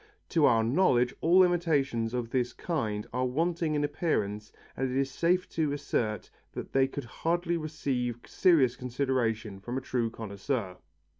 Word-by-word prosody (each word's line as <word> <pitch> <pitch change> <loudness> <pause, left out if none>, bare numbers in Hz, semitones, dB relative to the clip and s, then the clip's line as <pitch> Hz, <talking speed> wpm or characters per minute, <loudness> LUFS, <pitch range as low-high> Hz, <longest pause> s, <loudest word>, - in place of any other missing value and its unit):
To 160 -3 +3
our 115 -3 +4
knowledge 125 -2 +3
all 180 +3 +6
imitations 140 -10 +1
of 120 -2 -3
this 125 -2 0
kind 110 -11 -2
are 125 +1 0
wanting 165 +3 0
in 145 - +1
appearance 105 - -1 0.2
and 130 0 -1
it 130 - -2
is 135 0 0
safe 175 +6 +1
to 155 -3 0
assert 110 -8 -2 0.2
that - - -7
they 135 0 +4
could 140 +1 -6
hardly 170 +7 -1
receive 135 -7 -2
serious 140 -9 +3
consideration 120 -5 -1
from 120 +6 -4
a - - -2
true 125 -3 -1
connoisseur. 100 -2 -4
130 Hz, 155 wpm, -29 LUFS, 115-160 Hz, 0.2 s, all